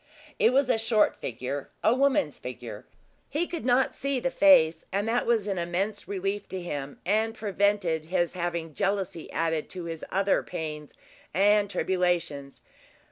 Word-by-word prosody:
It - - +5
was 270 +1 +3
a 230 - +2
short 225 -1 +3
figure 130 +4 -5
a 220 - +5
woman's 280 +2 +2
figure. - - -8 0.4
He 320 +4 0
could 340 -2 -5
not 250 +1 +3
see 275 -1 -1
the 265 +2 -1
face, 260 - +5
and 200 +3 -1
that 235 +2 +1
was 230 -4 +2
an 195 -3 -2
immense 190 +5 -2
relief 195 +1 -3
to 190 - -4
him, 145 -5 -5
and 220 +4 +1
prevented 200 -6 0
his 175 0 0
having 170 -3 -3
jealousy 195 -1 -2
added 160 -1 -1
to 180 -2 -6
his 165 -1 -6
other 195 +1 +2
pains 155 -3 -6 0.4
and 205 +2 +4
tribulations. 175 -7 -1
195 Hz, 155 wpm, -27 LUFS, 165-220 Hz, 0.4 s, It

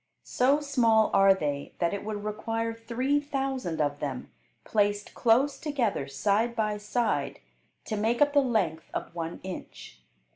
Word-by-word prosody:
So 275 +4 +2
small 230 -6 +3
are 195 0 +6
they 145 -5 -3
that 170 0 0
it 200 - -4
would 210 -1 -4
require 225 +2 -2
three 245 +5 0
thousand 270 - -3
of 145 -1 0
them, 140 -4 -5 0.3
placed 205 -1 0
close 255 +5 +3
together, 240 - -1
side 205 - 0
by 215 -2 0
side, 210 +3 -1 0.5
to 220 - -3
make 225 +3 0
up 290 0 +4
the 290 - +6
length 205 - -1
of - - -4
one 165 -1 -5
inch. 180 - -9
220 Hz, 150 wpm, -28 LUFS, 185-250 Hz, 0.5 s, are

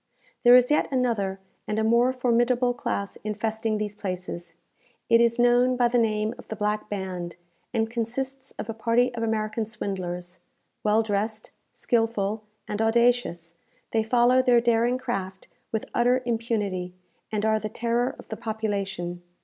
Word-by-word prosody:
There 245 0 +8
is 250 +2 +5
yet 300 - +3
another 225 -7 0 0.3
and 215 - -1
a 220 - +1
more 235 +3 +4
formidable 245 0 +2
class 200 -4 -3
infesting 215 +1 -2
these 210 -1 -3
places. 180 -4 -6 0.6
It 230 0 +7
is 235 0 +3
known 245 +1 +4
by 240 -1 +3
the 245 0 +2
name 215 -1 +1
of - - -12
the 220 - -5
Black 210 0 -1
Band, 185 -4 -4 0.4
and 225 -2 +1
consists 260 +4 -4
of - - -5
a 225 - -3
party 235 +2 +2
of 235 - -4
American 220 0 -1
swindlers. 185 -5 -5 0.4
Well 215 +1 +3
dressed, 215 +1 -2 0.2
skilful, 225 -3 0 0.3
and 210 +1 -2
audacious, 225 -7 +2 0.4
they 225 - +2
follow 245 +3 +4
their 250 -2 +5
daring 235 +1 +2
craft 190 -6 -4 0.2
with 220 - -2
utter 250 +2 +3
impunity, 210 -6 -2 0.4
and 215 0 -1
are 220 0 +3
the 215 - -4
terror 235 +3 0
of - - -14
the 220 - -5
population. 200 -5 -3
225 Hz, 155 wpm, -26 LUFS, 205-240 Hz, 0.6 s, There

